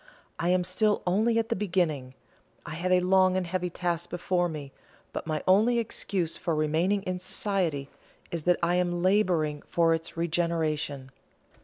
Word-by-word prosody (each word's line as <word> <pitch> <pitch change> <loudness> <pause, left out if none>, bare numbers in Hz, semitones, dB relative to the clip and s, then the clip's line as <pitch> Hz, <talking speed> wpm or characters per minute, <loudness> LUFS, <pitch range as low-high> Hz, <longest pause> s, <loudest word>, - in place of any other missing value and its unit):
I 170 - 0
am 180 0 +3
still 205 +4 +1
only 220 +6 +2
at 225 0 0
the - - +1
beginning. 170 -10 -1 0.5
I 150 - -6
have 175 +3 -2
a 180 0 +5
long 185 0 +4
and 185 - -1
heavy 180 +1 -2
task 175 -1 -2
before 175 0 0
me; 145 -4 -7 0.4
but - - -5
my 155 -2 -2
only 215 +6 +4
excuse 195 -6 -1
for 170 -3 -1
remaining 165 +6 +1
in 185 -1 -3
society 180 -6 -2 0.4
is 170 - -2
that 180 0 +4
I 175 +1 +2
am 175 -1 0
labouring 180 -7 +2
for 165 -1 +3
its 165 0 -4
regeneration." 160 -5 -1
175 Hz, 165 wpm, -28 LUFS, 160-185 Hz, 0.5 s, a